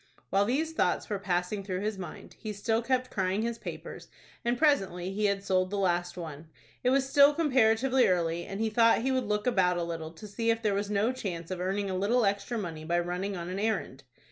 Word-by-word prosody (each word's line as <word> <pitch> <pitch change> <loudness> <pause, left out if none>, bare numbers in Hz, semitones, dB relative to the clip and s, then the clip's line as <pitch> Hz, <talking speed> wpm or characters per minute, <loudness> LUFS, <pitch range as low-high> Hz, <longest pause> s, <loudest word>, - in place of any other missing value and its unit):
While 200 +1 +3
these 305 +8 0
thoughts 300 - 0
were 205 - -1
passing 190 +1 -1
through 185 -1 -3
his 210 -1 -2
mind, 180 - -9
he 215 -1 -5
still 225 +3 0
kept 255 +1 0
crying 190 +2 0
his 235 0 -3
papers, - - -8 0.4
and 240 0 +1
presently 195 - +1
he 210 +1 0
had 200 -1 +1
sold 185 -1 +1
the 205 - -3
last 175 -2 0
one. 160 -2 -7 0.4
It 250 - +3
was 270 +1 +2
still 285 +1 +6
comparatively 260 -4 +3
early, 170 -2 +1
and 195 - -5
he 220 0 0
thought 230 +1 +4
he 265 - +1
would 255 -4 0
look 210 0 0
about 185 -7 +2
a 175 - -1
little 165 -2 -4
to 170 - -11
see 230 +3 -2
if 230 0 +1
there 210 -2 +2
was 200 +1 -1
no 210 +3 +2
chance 180 -9 -5
of 180 -1 -3
earning 195 +2 -1
a 190 - -2
little 215 +5 +2
extra 200 +4 -1
money 165 -7 -5
by 170 +2 0
running 180 +3 -3
on 170 0 -5
an 190 - -3
errand. 200 - -2
200 Hz, 225 wpm, -29 LUFS, 180-230 Hz, 0.4 s, still